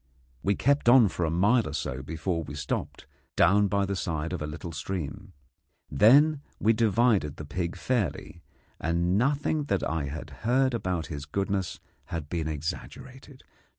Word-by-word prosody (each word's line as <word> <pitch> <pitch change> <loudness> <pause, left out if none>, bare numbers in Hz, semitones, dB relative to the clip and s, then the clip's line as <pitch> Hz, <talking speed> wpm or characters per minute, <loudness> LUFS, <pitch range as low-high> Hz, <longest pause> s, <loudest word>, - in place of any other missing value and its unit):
We 100 +1 +1
kept 140 -2 +2
on 120 -4 +7
for 90 - -2
a - - 0
mile 105 +8 +3
or - - -7
so 65 - -3
before 80 +4 -3
we 75 -2 -7
stopped, 70 -2 -4 0.3
down 100 +3 +4
by 100 0 +1
the 100 0 -2
side 80 -2 -3
of 90 - -4
a 75 - -3
little 80 +3 -7
stream. 90 +4 -5 0.6
Then 140 - +5 0.2
we 110 +2 +4
divided 110 - +2
the 75 - -7
pig 85 +3 -3
fairly, 105 -7 -2 0.4
and 85 +3 0
nothing 145 +5 +1
that 100 -9 0
I 80 -3 -2
had 75 +3 -7
heard 130 +3 +2
about 90 -8 -2
his 70 0 -6
goodness 95 +2 -2 0.3
had 80 -3 -5
been 80 -3 -2
exaggerated. 130 - -7
95 Hz, 160 wpm, -27 LUFS, 80-115 Hz, 0.6 s, on